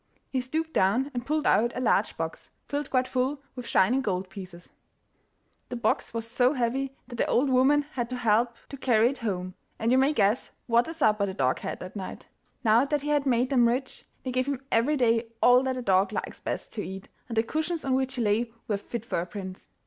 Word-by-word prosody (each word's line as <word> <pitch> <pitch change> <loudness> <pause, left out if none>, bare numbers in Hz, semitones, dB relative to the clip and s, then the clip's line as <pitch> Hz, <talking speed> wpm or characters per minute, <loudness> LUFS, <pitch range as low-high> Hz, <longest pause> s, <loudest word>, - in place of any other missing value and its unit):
He 260 - 0
stooped 320 +5 -3
down 235 +9 +2
and 245 -1 -4
pulled 305 +1 0
out 235 +2 +3
a - - 0
large 255 - +1
box, - - -5 0.2
filled 290 -1 -3
quite 255 -1 +1
full 270 +2 -1
with 250 -2 -7
shining 250 +8 +3
gold 190 -4 -2
pieces. 180 -3 -10 1.0
The - - -4
box 235 - 0
was 230 -1 -4
so 250 +3 +2
heavy 265 +1 -1
that 240 - -8
the - - +1
old 265 +2 +2
woman 270 +3 +4
had 240 -2 -3
to 255 - -3
help 235 0 +2
to 275 - -7
carry 240 -2 +3
it 275 - -7
home, 185 -5 -3 0.2
and 225 +2 0
you 260 - +5
may 270 +2 +4
guess 215 -3 +1
what 235 0 +3
a 325 - -5
supper 215 -9 +2
the 190 - -5
dog 130 -1 +1
had - - -5
that 185 +2 -8
night! 190 -2 -6 0.4
Now 225 +2 +5
that 290 +1 0
he 295 - -3
had 290 -2 +2
made 250 +1 +2
them 245 -3 +5
rich, 255 +3 -2 0.2
they 255 - -3
gave 255 +1 0
him 275 -2 -3
every 270 +7 +3
day 230 -2 +2
all 245 +1 +6
that 260 -1 -1
a 250 - -4
dog 190 -1 +3
likes - - -4
best - - -4
to 210 - -3
eat, 190 0 -7 0.2
and 230 -3 -5
the 225 - +4
cushions 315 +5 -2
on 265 - +1
which 265 0 0
he 245 - -1
lay 225 +3 +1 0.2
were 205 - 0
fit 230 +2 -6
for 230 - -1
a 175 - -5
prince. 190 0 -8
245 Hz, 230 wpm, -27 LUFS, 215-265 Hz, 1.0 s, all